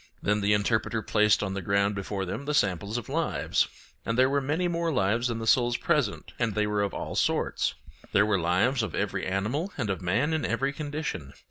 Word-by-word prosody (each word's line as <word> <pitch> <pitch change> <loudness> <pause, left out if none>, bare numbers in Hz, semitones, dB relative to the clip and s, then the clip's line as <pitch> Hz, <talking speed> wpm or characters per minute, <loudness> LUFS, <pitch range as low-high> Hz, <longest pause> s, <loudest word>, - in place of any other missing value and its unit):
Then 105 +1 +1
the 100 +1 +3
Interpreter 110 +2 0
placed 105 -1 +3
on 95 -2 -2
the 100 - -3
ground 100 +2 +1
before 100 0 -3
them 95 +10 -5
the 150 +1 -1
samples 100 - +1
of 120 - -5
lives; - - 0 0.4
and 115 - -2
there 130 +1 +4
were 140 0 +2
many 155 +6 0
more 170 -1 0
lives 115 0 +1
than 115 -2 -2
the 115 - -4
souls 120 +1 +3
present, - - -1
and 115 -3 0
they 105 0 +2
were 105 -1 0
of 100 -1 0
all - - -4
sorts. - - 0 0.4
There 100 - +4
were 105 -3 +2
lives 95 +10 +2
of 110 -6 -3
every - - -2
animal 110 - -1
and 110 -7 -1
of 95 -2 -3
man 120 - +1
in 155 - 0
every 135 +1 0
condition. 145 - -4
110 Hz, 215 wpm, -27 LUFS, 100-135 Hz, 0.4 s, there